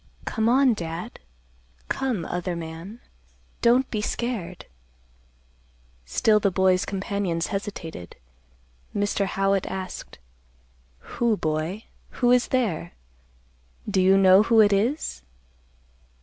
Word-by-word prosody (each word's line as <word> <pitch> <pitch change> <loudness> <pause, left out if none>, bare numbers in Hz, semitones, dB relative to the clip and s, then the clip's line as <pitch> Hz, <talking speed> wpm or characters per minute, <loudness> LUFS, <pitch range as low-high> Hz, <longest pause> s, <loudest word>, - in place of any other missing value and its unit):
Come 220 0 0
on, 260 0 +4
Dad. 175 +3 -6 0.7
Come, 240 -11 -2
other 175 +1 -3
man. 170 +7 -8 0.6
Don't 250 +3 +4
be 215 - -1
scared." 210 -6 -4 1.4
Still 210 - +3
the 200 - +2
boy's 185 0 +2
companions 190 -3 -2
hesitated. 180 - -6 0.8
Mr. 205 -1 0
Howitt 195 0 0
asked, 190 -1 -6 0.8
"Who, 235 -3 -1
boy? 160 +7 -2 0.3
who 245 -1 +3
is 250 0 +4
there? 200 -10 -1 0.9
Do 195 -2 +1
you 190 +1 +5
know 190 0 +7
who 225 +1 +3
it 205 -2 +6
is?" 220 - -1
195 Hz, 105 wpm, -25 LUFS, 180-225 Hz, 1.4 s, know